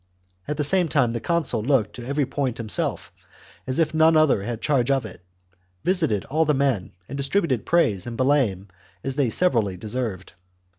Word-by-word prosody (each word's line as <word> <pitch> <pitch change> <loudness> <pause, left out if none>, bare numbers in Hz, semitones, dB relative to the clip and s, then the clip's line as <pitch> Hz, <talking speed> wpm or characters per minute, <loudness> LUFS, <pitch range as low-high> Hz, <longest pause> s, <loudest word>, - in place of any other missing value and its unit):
At 150 - -3
the 150 - 0
same 180 +4 +2
time 130 -7 +2
the 115 - -2
consul 160 -9 -1
looked 120 -4 +1
to 120 -1 -8
every 140 +1 0
point 135 -2 -2
himself, 110 -3 -2 0.6
as 130 - -1
if 160 -2 +1
none 160 0 +5
other 155 -9 +3
had 115 +2 -4
charge 135 -3 +1
of 135 -3 +1
it; 90 -3 -11 0.6
visited 160 - +1
all 155 +4 +1
the 150 -2 +1
men, 135 -9 0
and 135 - -7
distributed 140 - -1
praise 110 - +2
and 115 -1 -6
blame 130 -8 +1 0.3
as 135 - -2
they 140 0 +1
were - - -1
severally 110 - +1
deserved. 105 -2 -4
135 Hz, 185 wpm, -23 LUFS, 115-150 Hz, 0.6 s, none